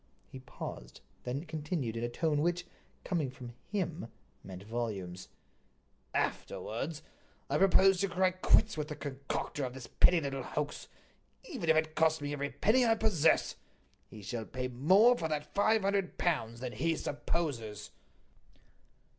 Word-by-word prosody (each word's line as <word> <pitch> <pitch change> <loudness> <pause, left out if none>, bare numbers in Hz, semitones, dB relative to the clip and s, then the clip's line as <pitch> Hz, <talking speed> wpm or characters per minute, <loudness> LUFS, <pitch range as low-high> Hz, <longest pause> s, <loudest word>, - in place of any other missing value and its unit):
He 130 - -8
paused, 60 - -8 0.2
then 135 +6 -3
continued 150 -6 -3
in 115 - -3
a 120 - -1
tone 150 +3 0
which, 175 +2 0 0.4
coming 160 -7 -1
from 125 -2 -10 0.2
him, 175 - -2 0.4
meant 95 0 -9
volumes: 100 -5 -4 0.9
"Afterwards, 145 +8 -2 0.5
I 145 - +2
propose 195 0 +5
to 195 - +2
cry 185 +1 +2
quits 185 +4 +3
with 150 -1 -2
the 150 - -5
concocter 140 0 -4
of 125 -1 -4
this 130 -2 -7
pretty 175 +8 +4
little 135 -3 -3
hoax, 145 +3 -4 0.6
even 260 - -4
if 160 - +6
it 155 0 +1
costs 160 0 +3
me 145 0 -3
every 140 0 -2
penny 215 - +3
I 225 -1 +4
possess. 200 -8 +2 0.5
He 105 -2 -11
shall 110 +2 -4
pay 125 +2 -4
more 190 - +5
for 165 - -2
that 150 -1 -4
five 215 +1 +3
hundred 195 -2 0
pounds 120 -9 -1
than 125 -1 -3
he 165 0 0
supposes." 130 -10 -3
150 Hz, 150 wpm, -32 LUFS, 125-175 Hz, 0.9 s, if